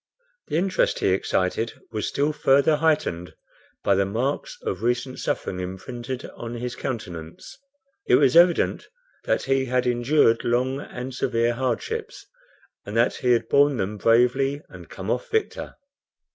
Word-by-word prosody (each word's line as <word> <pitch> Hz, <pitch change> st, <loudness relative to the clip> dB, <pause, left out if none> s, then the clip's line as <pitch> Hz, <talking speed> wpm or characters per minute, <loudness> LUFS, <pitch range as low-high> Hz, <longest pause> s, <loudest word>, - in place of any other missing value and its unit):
The 155 Hz, -, -1 dB
interest 185 Hz, +2 st, +1 dB
he -, -, +1 dB
excited 95 Hz, +3 st, 0 dB, 0.2 s
was 110 Hz, -2 st, -2 dB
still 145 Hz, +2 st, 0 dB
further 140 Hz, +2 st, +3 dB
heightened 150 Hz, -, 0 dB, 0.5 s
by 100 Hz, -, +3 dB
the 100 Hz, 0 st, +3 dB
marks 130 Hz, -, -2 dB
of -, -, -3 dB
recent 120 Hz, +2 st, -1 dB
suffering 90 Hz, -, -2 dB
imprinted 120 Hz, +8 st, -6 dB
on 120 Hz, 0 st, -7 dB
his 120 Hz, +1 st, -4 dB
countenance. 90 Hz, -10 st, -6 dB, 0.5 s
It -, -, +6 dB
was 135 Hz, 0 st, +4 dB
evident 175 Hz, 0 st, +4 dB, 0.4 s
that -, -, +1 dB
he 135 Hz, 0 st, +1 dB
had 125 Hz, 0 st, 0 dB
endured 120 Hz, 0 st, +3 dB
long 130 Hz, +3 st, 0 dB
and 125 Hz, 0 st, -7 dB
severe 120 Hz, -2 st, 0 dB
hardships, 420 Hz, -, -3 dB, 0.6 s
and 105 Hz, +2 st, -5 dB
that 120 Hz, +2 st, +2 dB
he 125 Hz, -1 st, +2 dB
had 115 Hz, -1 st, 0 dB
borne 140 Hz, 0 st, +4 dB
them 105 Hz, +1 st, -2 dB
bravely 125 Hz, +6 st, +2 dB
and -, -, -12 dB
come -, -, -5 dB
off -, -, -2 dB
victor. 445 Hz, -1 st, -2 dB
125 Hz, 145 wpm, -24 LUFS, 115-140 Hz, 0.6 s, It